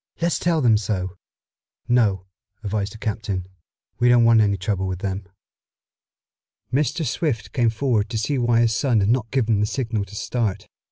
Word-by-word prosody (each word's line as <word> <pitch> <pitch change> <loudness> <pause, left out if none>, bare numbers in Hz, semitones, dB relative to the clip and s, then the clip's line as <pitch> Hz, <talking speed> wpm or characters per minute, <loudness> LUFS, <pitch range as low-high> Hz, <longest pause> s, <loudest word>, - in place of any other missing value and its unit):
"Let's 170 0 0
tell 170 -2 +1
them 115 -4 +5
so." 95 -3 -3 0.7
"No," 105 -7 +2 0.4
advised 100 0 -2
the - - -10
captain. 105 -4 -3 0.5
"We 120 - +4
don't 120 -1 +6
want 115 -1 +6
any 100 -2 +2
trouble 95 0 -2
with 95 -1 -3
them." 95 0 -4 1.5
Mr. 145 +4 0
Swift 125 - -2
came 120 -3 +2
forward 115 -2 0
to 115 - -3
see 130 +5 -1
why 120 -1 +3
his 115 -1 +2
son 115 -2 +2
had 100 - +1
not 115 -2 +1
given 115 -5 +1
the 105 - +1
signal 115 -4 -2
to 100 +2 -12
start. 110 -2 -2
110 Hz, 170 wpm, -22 LUFS, 100-120 Hz, 1.5 s, don't